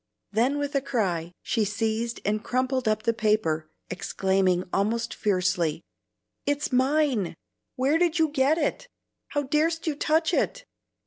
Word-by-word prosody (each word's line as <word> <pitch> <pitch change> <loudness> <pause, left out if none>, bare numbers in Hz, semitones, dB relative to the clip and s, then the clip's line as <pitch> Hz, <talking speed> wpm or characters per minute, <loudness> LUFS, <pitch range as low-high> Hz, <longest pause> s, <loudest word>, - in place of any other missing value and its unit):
Then 245 +7 +2
with 285 0 -2
a 275 - +2
cry 180 -11 -1
she 225 - +1
seized 220 +3 -1
and 215 +1 0
crumpled 255 -1 0
up 215 0 +1
the 230 - +2
paper, 210 -8 +1 0.2
exclaiming 185 0 +1
almost 225 +4 0
fiercely, 180 -5 0 0.6
"It's 290 0 0
mine! 260 - +2 0.4
Where 275 +5 +2
did 345 -1 +2
you 320 -2 +3
get 290 +2 +2
it? 330 +9 -1 0.4
How 290 - -1
dar'st 315 +4 +1
you 315 - +1
touch 315 +3 +1
it?" - - 0
235 Hz, 140 wpm, -26 LUFS, 200-290 Hz, 0.6 s, you